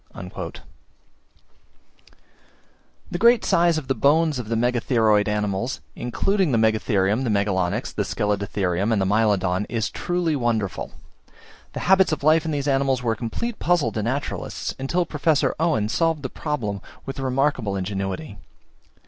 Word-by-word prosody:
The - - -2
great 235 -1 +5
size 170 -1 +3
of 150 -4 -5
the 135 - +2
bones 145 +3 +2
of 115 -3 -6
the 115 - 0
Megatheroid 115 -3 +2
animals, 105 +3 -1 0.2
including 185 - 0
the 120 - +2
Megatherium, 110 -1 +2
Megalonyx, 100 -1 0
Scelidotherium, 100 -2 -1
and 105 -3 +2
Mylodon, 100 -2 +1
is 115 -2 -1
truly 175 -3 -1
wonderful. 115 -7 -1 0.8
The - - -4
habits 190 -1 +4
of 155 - -2
life 155 +1 +4
of 160 - -1
these 145 -1 -2
animals 135 -2 +1
were 115 - +1
a - - -5
complete 170 - -4
puzzle 170 -10 +2
to 110 - -3
naturalists, 130 +6 -3
until 170 +7 0
Professor 150 -1 +1
Owen 155 -11 +1
solved 160 +5 0
the 130 - -3
problem 110 -12 -3 0.2
with 135 - -6
remarkable 130 -5 0
ingenuity. 95 - -4
120 Hz, 130 wpm, -23 LUFS, 105-150 Hz, 0.8 s, great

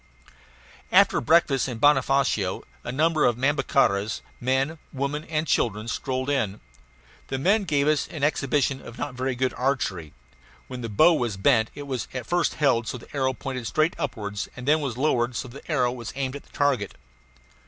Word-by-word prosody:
After - - +5
breakfast 135 -2 +3
at 120 -3 -5
Bonofacio 135 -8 +2 0.2
a 120 - -4
number 155 +3 +2
of 120 -2 +3
Nhambiquaras 135 -6 +1 0.2
men, 135 +5 0
women, 140 +2 -2
and 155 0 -1
children 110 -6 0
strolled 130 +2 -2
in. 115 -8 0 0.7
The 135 - -2
men 195 +9 +2
gave 145 -4 +1
us 155 -1 +2
an 150 -4 -7
exhibition 140 -2 +1
of 115 - -11
not 145 -2 -4
very 130 +1 -2
good 130 +1 0
archery; 100 - -2 0.5
when 125 -1 -7
the 115 - -4
bow 155 +12 +5
was 120 -9 -1
bent, 110 +3 +3
it 145 - -6
was 130 -4 -3
at 125 - -4
first 175 0 0
held 125 -6 +2
so - - -3
that 115 - -15
the - - -10
arrow 130 -1 +1
pointed 130 -2 -5
straight 155 +3 +1
upwards 105 -9 -4
and 125 - -7 0.2
was 135 -6 -3
then 130 - -4
lowered 120 -4 +1
so 130 - -3
that 135 +4 -12
the - - -5
arrow 125 -5 +2
was 120 -4 -6
aimed 135 -1 -2
at 140 - -9
the - - -24
target. 135 -8 0
130 Hz, 185 wpm, -25 LUFS, 120-145 Hz, 0.7 s, After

